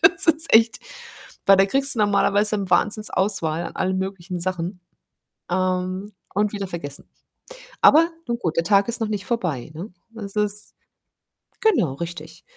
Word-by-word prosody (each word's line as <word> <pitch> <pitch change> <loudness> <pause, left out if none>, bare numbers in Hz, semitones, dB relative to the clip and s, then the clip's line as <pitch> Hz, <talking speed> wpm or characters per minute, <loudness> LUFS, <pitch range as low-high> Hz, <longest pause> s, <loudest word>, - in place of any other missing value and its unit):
das - - +5
ist 320 0 +5
echt 225 0 +5 0.7
weil 195 0 +6
da 195 - +5
kriegst 270 +5 +1
du - - -6
normalerweise, 205 0 +2
hm, 195 -2 -5
Wahnsinns-Auswahl 190 -6 +1
an - - -8
allen 190 0 -1
möglichen 190 -2 -5
Sachen, 180 +1 -3 0.7
ähm 185 +2 -2 0.2
und 210 +1 +1
wieder 200 -2 -4
vergessen. 155 -6 -6 0.7
Aber 330 +3 +6 0.2
nun 235 0 -1
gut, 165 -8 -3
der 165 - +2
Tag 200 +2 +3
ist 235 +1 -1
noch 225 - 0
nicht 205 -2 -4
vorbei, 170 - -2
ne? 180 +6 -8 0.2
Das 210 -3 -9
ist 210 0 -3 0.9
genau 340 - +2
richtig. 165 +2 -8
195 Hz, 155 wpm, -22 LUFS, 175-215 Hz, 0.9 s, weil